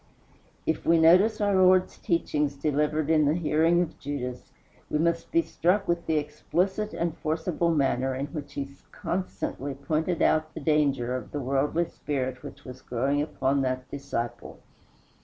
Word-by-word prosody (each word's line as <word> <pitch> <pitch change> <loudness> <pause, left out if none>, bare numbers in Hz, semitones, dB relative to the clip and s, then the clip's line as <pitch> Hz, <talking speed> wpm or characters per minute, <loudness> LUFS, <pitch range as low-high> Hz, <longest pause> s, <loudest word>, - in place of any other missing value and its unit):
If 160 - -1
we 165 - +4
notice 185 +7 +5
our 205 -1 +2
Lord's 185 -1 +4
teachings 150 -4 0
delivered 150 +2 0
in 155 -2 +4
the 145 +2 +2
hearing 165 +1 +3
of 165 - -9
Judas, 130 -3 -5 0.4
we - - 0
must 170 +1 0
be 335 +1 +3
struck 195 - +1
with 170 0 -1
the 160 - +2
explicit 180 +7 -1
and 170 -1 -1
forcible 165 +2 -1
manner 135 -4 +1
in 135 +2 -2
which 145 -3 -6
he 140 -1 -4 0.2
constantly 145 -6 -4
pointed 155 +5 -1
out 155 0 +2
the - - -4
danger 140 -5 +1
of 130 - -5
the 145 - -3
worldly 140 +5 0
spirit 130 -5 -3
which - - -11
was 130 0 -9
growing 135 +4 0
upon 135 -2 0
that 130 -1 -2
disciple. 120 -4 -5
150 Hz, 160 wpm, -27 LUFS, 140-170 Hz, 0.4 s, notice